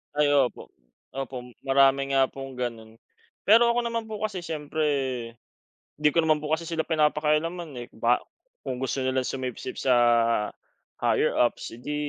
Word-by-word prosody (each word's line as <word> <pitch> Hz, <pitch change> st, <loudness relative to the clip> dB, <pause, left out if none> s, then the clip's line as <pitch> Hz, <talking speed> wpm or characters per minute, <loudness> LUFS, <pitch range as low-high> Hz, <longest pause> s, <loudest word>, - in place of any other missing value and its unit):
Ay, 150 Hz, 0 st, +3 dB
opo, 130 Hz, -3 st, +1 dB, 0.5 s
opo 135 Hz, -1 st, -4 dB, 0.3 s
marami 135 Hz, 0 st, +3 dB
nga 135 Hz, -1 st, +4 dB
pong 135 Hz, -2 st, -9 dB
ganun. 115 Hz, -2 st, -5 dB, 0.5 s
Pero 235 Hz, +3 st, +7 dB
ako 240 Hz, -, +1 dB
naman 230 Hz, -1 st, -2 dB
po 215 Hz, -, -4 dB
kasi 195 Hz, -5 st, -3 dB
siyempre, 155 Hz, -1 st, -3 dB, 1.1 s
di 150 Hz, 0 st, +3 dB
ko 165 Hz, -, +2 dB
naman 155 Hz, -2 st, +2 dB
po 150 Hz, -, -4 dB
kasi 160 Hz, +1 st, 0 dB
sila 165 Hz, -2 st, -1 dB
pinapakialaman, 155 Hz, +1 st, +1 dB
eh, 120 Hz, -, -7 dB
ba 120 Hz, +2 st, +2 dB, 0.4 s
kung -, -, -4 dB
gusto 135 Hz, -, -1 dB
nilang 130 Hz, 0 st, 0 dB
sumipsip 130 Hz, -1 st, -5 dB
sa 130 Hz, -2 st, +3 dB, 1.0 s
higher -, -, +2 dB
ups, 120 Hz, -, +1 dB
edi 125 Hz, +6 st, -5 dB
145 Hz, 150 wpm, -26 LUFS, 130-160 Hz, 1.1 s, Pero